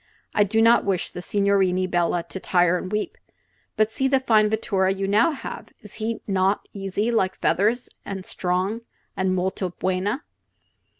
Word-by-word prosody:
I 210 - +4
do 220 +3 +2
not 230 +1 +5
wish 190 -3 -1
the 180 - -7
signorini 195 -1 +2
bella 175 -1 0
to 190 - -6
tire 180 -1 +2
and 185 +1 -4
weep. 210 0 -3 0.6
But 215 0 +2
see 265 +4 0
the 270 0 +3
fine 215 -5 +3
vetture 195 -3 +1
you 195 0 -1
now 210 +8 +4
have! 300 - -7
Is 210 - -13
he 225 +1 -2
not 195 0 +1
easy 200 +3 -2
like 190 -5 +1
feathers, 225 +5 +1 0.2
an' 195 -1 -6
strong, 185 +5 -2 0.3
an' 190 -1 0
molto 185 0 -1
buena?" 190 - -2
195 Hz, 165 wpm, -24 LUFS, 185-215 Hz, 0.6 s, not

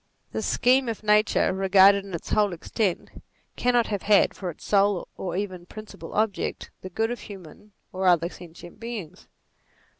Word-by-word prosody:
The - - -3
scheme 255 0 +2
of 220 -1 -5
Nature 210 -2 +3
regarded 195 +1 +5
in 195 -3 -6
its 170 - -7
whole 205 -3 +2
extent, 185 +3 -2 0.4
cannot 245 -1 +2
have 205 -3 -3
had, 205 -1 +4
for 185 - -5
its 165 - -10
sole 200 -2 +2
or 180 -2 -4
even 185 -3 -5
principal 210 -6 -10
object, 215 -2 -1
the 185 - -7
good 225 +5 -1
of 245 - -4
human 195 +1 -12 0.2
or 185 0 -1
other 170 -2 +4
sentient 175 -1 -13
beings. 210 -7 -7
200 Hz, 160 wpm, -25 LUFS, 180-215 Hz, 0.4 s, regarded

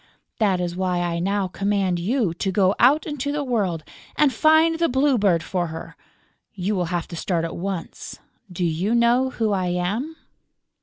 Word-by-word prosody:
That 200 -5 +2
is 175 -1 -3
why 180 -1 -1
I 170 -1 -1
now 195 +2 0
command 195 -1 0
you 210 0 0
to 190 +3 -2
go 190 0 +3
out 275 +6 +4
into 285 -2 -3
the 295 0 -2
world 200 - -1 0.3
and 290 -3 +3
find 315 +5 +4
the 335 - +2
Blue 270 +2 +2
Bird 180 -5 +2
for 180 -3 -2
her. 160 0 -8 0.6
You 195 +2 -1
will 180 -2 0
have 170 0 -3
to 170 - -7
start 165 0 -1
at 165 - -5
once.... 185 -1 -5 0.3
Do 180 0 -2
you 175 +8 0
know 240 +2 +3
who 225 -4 -1
I 185 -2 0
am?" 200 - -2
195 Hz, 185 wpm, -23 LUFS, 175-245 Hz, 0.6 s, out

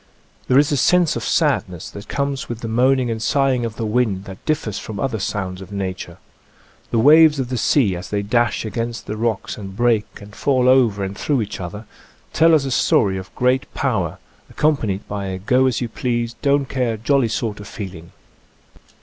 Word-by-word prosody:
There 130 - +4
is 145 +1 +4
a 145 - +1
sense 175 +2 +3
of - - -3
sadness 90 -3 0
that 100 - -10
conies 140 -1 -2
with 120 -1 -5
the 115 - -4
moaning 125 +2 +2
and 110 -1 -4
sighing 135 -1 +1
of 110 -2 -5
the 115 - -3
wind 105 -4 0
that 95 -2 -10
differs 145 -10 -1
from 105 -3 -7
other 120 -3 -1
sounds 95 -2 -3
of 95 - -11
nature. 95 -3 -5 0.7
The - - 0
waves 150 +4 +6
of 125 -2 -2
the 125 - -2
sea 105 -9 +2
as 90 +1 -7
they 100 -1 -1
dash 120 +2 +1
against 115 +1 -4
the 105 - -4
rocks 110 -1 -2
and 95 -2 -8
break 120 -3 +2
and 105 0 -13
fall 130 -3 +1
over 120 -6 +4
and 95 +1 -4
through 135 +1 0
each 105 - -7
other, 105 +5 -7 0.5
tell 165 0 +5
us 145 -3 +1
a 135 - -3
story 100 -5 +2
of 95 - -10
great 125 +1 +1
power, 105 - -1 0.3
ac - - -18
companied 115 -11 0
by 100 -1 -4
a 95 -1 -3
go 125 +7 +2
as 130 - -1
you 120 - -1
please, 120 0 -2
don't 140 0 +2
care, 125 -4 -1
jolly 135 +2 +2
sort 110 -1 -3
of 105 - -9
feeling. 90 -6 -8
115 Hz, 200 wpm, -20 LUFS, 100-130 Hz, 0.7 s, waves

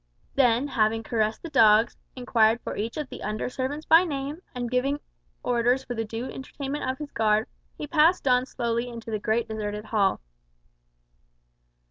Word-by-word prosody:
Then, 250 0 +3
having 225 -2 +1
caressed 220 -1 -1
the 335 - -6
dogs, 225 -3 +5 0.2
inquired 235 -3 +3
for - - -5
each 225 +6 -4
of 300 -2 -3
the - - -9
under 215 +3 -3
servants 280 +5 -3
by 325 +2 +7
name, 290 0 -4
and 245 -1 -2
given 260 +4 0 0.4
orders 245 +2 +2
for 245 - -5
the 225 -1 -2
due 225 +3 -5
entertainment 275 +2 -5
of 260 - -2
his 295 0 -7
guard, 215 0 +2 0.3
he - - -4
passed 315 +1 +3
on 250 0 +3
slowly 235 -1 -2
into 230 -1 -8
the 215 - -1
great 225 +2 0
deserted 210 -1 -4
hall. 205 -4 +1
240 Hz, 165 wpm, -26 LUFS, 220-275 Hz, 0.4 s, by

